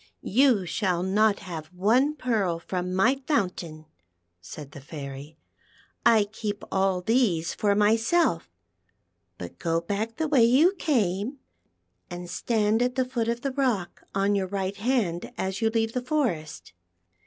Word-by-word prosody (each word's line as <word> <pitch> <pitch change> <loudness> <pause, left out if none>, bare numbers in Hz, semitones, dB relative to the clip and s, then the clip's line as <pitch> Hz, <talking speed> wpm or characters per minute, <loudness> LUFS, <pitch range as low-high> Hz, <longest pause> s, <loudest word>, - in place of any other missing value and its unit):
" - - -48 0.2
You 240 -9 +4
shall 180 -1 -1
not 205 +2 +2
have 165 -5 -7
one 225 - +2
pearl 220 - 0
from 180 +1 -4
my 235 +9 +2
fountain," 180 - -2 0.6
said 140 - -10
the 145 - -10
Fairy; 140 +1 -8 0.4
" - - -33
I 210 - +4
keep 205 0 -5
all 190 -1 +1
these 185 -6 +1
for 205 -1 +1
myself, 220 - +2 0.9
but 90 -1 -9
go 165 0 0
back 205 +6 -3
the 320 0 0
way 280 -6 +4
you 275 +11 +5
came, 240 - 0 0.7
and 175 0 -7
stand 220 +2 +1
at 250 0 0
the 260 -1 +1
foot 240 -3 -2
of 235 +1 -1
the 275 - -2
rock 250 -10 -1
on 195 +1 +2
your 195 -2 0
right 195 0 -3
hand 205 -7 -1
as 190 +3 -3
you 225 - +3
leave 225 0 0
the 250 - -1
forest. 175 - -2
205 Hz, 155 wpm, -26 LUFS, 175-240 Hz, 0.9 s, you